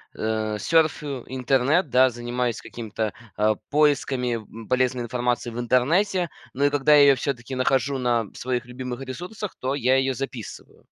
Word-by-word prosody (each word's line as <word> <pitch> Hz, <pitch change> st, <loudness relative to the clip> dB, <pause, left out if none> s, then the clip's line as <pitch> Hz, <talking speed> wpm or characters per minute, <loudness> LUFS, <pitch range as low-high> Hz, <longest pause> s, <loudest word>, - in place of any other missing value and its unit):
э, 110 Hz, -1 st, -1 dB
сёрфю 150 Hz, -3 st, +1 dB
интернет, 135 Hz, +5 st, +1 dB
да, 130 Hz, +1 st, +5 dB
занимаюсь 120 Hz, 0 st, -3 dB
какими-то, 110 Hz, -2 st, -4 dB, 0.2 s
а, 110 Hz, +1 st, +3 dB
поисками, 140 Hz, -4 st, +2 dB
м, 110 Hz, 0 st, -9 dB
полезной 130 Hz, -1 st, +1 dB
информации 120 Hz, 0 st, -1 dB
в 115 Hz, -, -6 dB
интернете, 170 Hz, -, +2 dB, 0.2 s
но 140 Hz, +2 st, +1 dB
и -, -, +5 dB
когда 145 Hz, +1 st, +4 dB
я 145 Hz, -, +8 dB
её 140 Hz, -1 st, +7 dB
всё-таки 130 Hz, -1 st, -4 dB
нахожу 135 Hz, +2 st, +1 dB
на 120 Hz, -3 st, +1 dB
своих 125 Hz, -2 st, -3 dB
любимых 125 Hz, 0 st, -6 dB
ресурсах, 180 Hz, +10 st, -6 dB
то 130 Hz, +2 st, -1 dB
я 130 Hz, -1 st, +2 dB
её 135 Hz, 0 st, +1 dB
записываю. 130 Hz, -4 st, -8 dB
130 Hz, 155 wpm, -24 LUFS, 120-140 Hz, 0.2 s, я